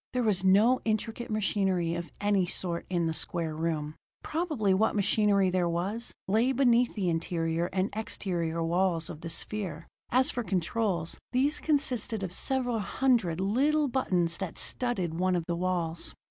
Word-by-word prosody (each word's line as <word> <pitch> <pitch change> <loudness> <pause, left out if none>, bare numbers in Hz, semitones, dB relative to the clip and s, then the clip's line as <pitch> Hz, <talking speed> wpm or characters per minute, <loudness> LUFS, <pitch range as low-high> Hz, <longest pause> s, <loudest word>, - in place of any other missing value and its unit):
There 250 -1 +1
was 200 -4 +1
no 210 +7 +5
intricate 225 +2 -2
machinery 190 -5 0
of 170 0 -4
any 205 -3 +2
sort 175 -1 -3
in 175 -2 0
the 160 - 0
square 160 -1 -3
room; 155 -2 -2 0.3
probably 300 - 0
what 215 +4 +2
machinery 205 -1 +3
there 180 -1 +1
was 195 +8 -2 0.2
lay 225 +6 +3
between 245 -2 +3
the 195 -4 -1
interior 165 0 0
and 190 +1 0
exterior 170 -6 -2
walls 170 -1 +1
of 150 - -10
the 165 - -5
sphere. 175 -4 -3 0.2
As 255 +2 +3
for 245 - -3
controls, 185 -2 -1
these 280 +4 +2
consisted 250 -8 0
of 180 -2 -4
several 245 0 0
hundred 215 -6 +1
little 280 +10 +2
buttons 180 -10 0
that 190 -4 -5
studded 185 -10 -1
one 185 0 +2
of 170 -2 -1
the 170 - -1
walls. 170 -2 -2
190 Hz, 160 wpm, -29 LUFS, 170-230 Hz, 0.3 s, no